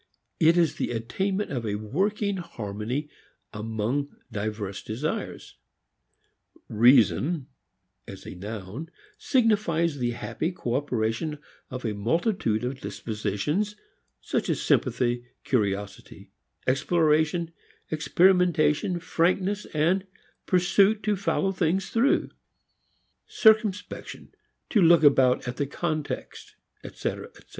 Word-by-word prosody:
It 165 +2 +5
is 170 -3 +2
the - - -1
attainment 190 - -2
of 125 -4 -2
a 105 -2 -2
working 195 - -1
harmony 115 - -4 0.5
among 110 +6 -2 0.2
diverse 105 -2 -4
desires. 125 +9 -4 1.1
"Reason" 125 - +4 0.6
as 95 - -10
a - - -7
noun 105 - -7 0.3
signifies 200 - +1
the 120 -1 0
happy 165 - -3
cooperation 125 0 -2 0.3
of 130 -2 -6
a 110 - -1
multitude 120 - 0
of 130 +2 -4
dispositions, 115 - -2 0.5
such - - -2
as - - 0
sympathy, 120 -1 +1 0.2
curiosity, 100 -4 -2 0.3
exploration, 155 +4 +2 0.4
experimentation, 175 0 +3
frankness, 185 +4 0 0.8
pursuit 195 +4 +3
to 210 -1 +1
follow 195 0 0
things 190 +1 0
through 235 +5 +2 1.0
circumspection, 215 -3 +1 0.4
to 210 - +4
look 170 -2 +6
about 130 -4 +4
at 125 - -4
the 140 - -1
context, 155 0 -4 0.3
etc., - - -4
etc. - - -20
150 Hz, 100 wpm, -26 LUFS, 115-180 Hz, 1.1 s, look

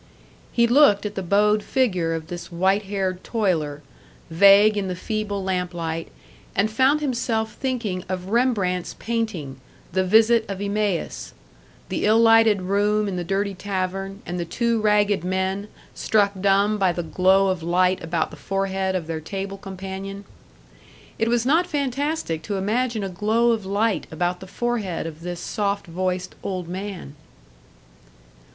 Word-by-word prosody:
He 235 - +3
looked 235 -5 +5
at 210 - -3
the 195 - -3
bowed 210 +3 +3
figure 185 -11 0
of 160 -1 -5
this 175 +2 -8
white 190 +4 +1
haired 190 -2 -2
toiler, 160 -10 -1 0.5
vague 200 +5 +6
in 200 -2 -1
the 180 - -3
feeble 205 0 -3
lamplight, 175 -3 -2 0.5
and 210 +2 +1
found 265 +6 +3
himself 235 -5 -1
thinking 230 -9 -3
of 185 0 -4
Rembrandt's 205 -7 +1
painting, 185 - -3 0.3
the 190 - +1
Visit 220 +4 +5
of 195 -1 -4
Emmaus: 205 -3 -2 0.5
the - - -2
ill 215 +1 +5
lighted 225 -3 +5
room 205 +2 +1
in 195 - -3
the 175 - -2
dirty 195 +3 -1
tavern, 195 +1 -4
and 175 0 -4
the - - -1
two 230 +6 0
ragged 210 -3 +2
men, 190 +2 -1 0.3
struck 205 -2 +2
dumb 200 +2 +3
by 190 -2 +3
the 175 0 -3
glow 190 +3 +3
of 185 -2 -1
light 180 +2 +1
about 165 -1 -1
the 155 - -11
forehead 195 +2 -1
of 180 -3 -2
their 160 -1 -4
table 195 +4 -5
companion. 195 +1 -7 0.9
It 225 - +2
was 240 0 +1
not 325 +6 +3
fantastic 280 - -2
to 200 +5 -4
imagine 220 +3 0
a 195 - -3
glow 215 +6 +2
of 215 -4 -2
light 205 +2 0
about 175 +3 -1
the 190 - -10
forehead 215 -5 -2
of 160 -1 -7
this 175 0 -5
soft 200 -2 -2
voiced 185 +1 -3
old 185 -3 -4
man! 185 -4 -6
195 Hz, 155 wpm, -23 LUFS, 180-215 Hz, 0.9 s, vague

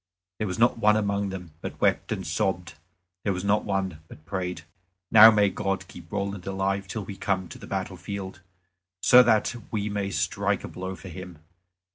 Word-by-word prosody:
There 110 - -1
was 90 - -3
not 115 0 +3
one 105 0 +4
among 100 -1 0
them 90 -3 -7
but - - -6
wept - - +1
and - - -2
sobbed; 90 -2 -1 0.5
there 100 - +1
was 90 0 -4
not 105 +1 +2
one 95 -5 -2
but 75 - -14
prayed, 90 -2 -4 0.5
"Now, 110 0 +11
may 105 -2 +4
God 95 -2 -2
keep 85 -2 -13
Roland 100 -1 -3
alive 95 0 -1
till 105 +1 -5
we 100 - -7
come 95 -2 -1
to - - -10
the - - -10
battle - - -3
field, 95 -2 -6 0.6
so 125 - +9
that 115 -3 +3 0.2
we 105 -1 -2
may 100 -1 -2
strike - - -1
a - - -5
blow 95 +1 -6
for 95 - -10
him." 90 -1 -9
95 Hz, 190 wpm, -26 LUFS, 95-105 Hz, 0.6 s, Now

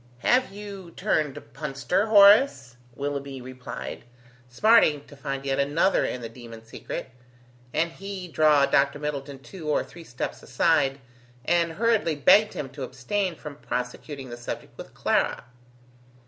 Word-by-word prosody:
"Have 255 -3 +3
you 200 -3 -9
turned 150 -3 0
punster, 145 - -1
Horace?" 200 - +6 0.2
Willoughby 140 -1 -4
replied, 125 -1 -8 0.5
smarting 150 - +4
to 145 - -14
find 135 0 -5
yet 135 0 0
another 145 +7 +2
in 125 - -3
the 115 - -5
demon 115 -1 -12
secret, 115 - -7 0.6
and 165 +2 0
he 195 0 -7
draw 155 -3 +4
Dr. 140 +1 +2
Middleton 145 -1 -5
two 155 +3 -8
or 150 - +2
three 170 - -13
steps 125 -5 -5
aside, 140 0 +1 0.5
and 170 -1 +2
hurriedly 220 -6 +1
begged 205 +9 +5
him 140 - -4
to 140 +2 -10
abstain 165 +9 -2
from 150 -2 -9
prosecuting 125 +2 -5
the 120 - -6
subject 120 - -7
with - - -11
Clara. - - 0
145 Hz, 140 wpm, -26 LUFS, 135-175 Hz, 0.6 s, Horace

